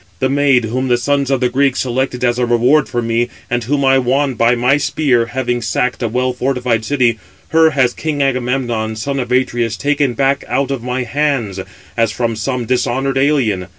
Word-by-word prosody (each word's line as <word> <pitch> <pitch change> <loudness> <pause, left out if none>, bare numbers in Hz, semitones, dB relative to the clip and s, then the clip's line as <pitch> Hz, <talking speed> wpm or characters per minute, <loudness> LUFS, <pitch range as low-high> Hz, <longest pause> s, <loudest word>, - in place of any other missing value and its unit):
The 130 - 0
maid 140 -3 +3
whom 130 +4 -2
the 120 -1 +2
sons 140 +2 0
of 135 -2 0
the 125 - +2
Greeks 135 +1 +1
selected 125 0 -2
as 120 0 +1
a 125 - +2
reward 125 +5 +3
for 120 -1 -2
me, 115 +1 0 0.2
and 120 -1 0
[whom] 140 +3 0
I 135 0 +4
won 135 +2 +1
by 115 +1 +2
my 125 +4 +2
spear, 130 -5 +1
having 120 0 -2
sacked 120 +3 -1
a 120 - 0
well 125 +3 -1
fortified 125 -2 -1
city, 120 -3 +1 0.3
her 160 0 +5
has 130 -4 +1
king 155 -2 -3
Agamemnon, 125 -4 -1
son 135 +5 -3
of 125 -1 -4
Atreus, 120 -3 0
taken 145 -3 0
back 140 +1 +1
out 140 0 -1
of 135 -3 -3
my 125 +1 -2
hands, 125 -6 -1 0.4
as 115 -2 +1
from 115 0 -2
some 125 +2 -3
dishonoured 130 +2 0
alien. 125 -10 +1
125 Hz, 195 wpm, -16 LUFS, 120-135 Hz, 0.4 s, her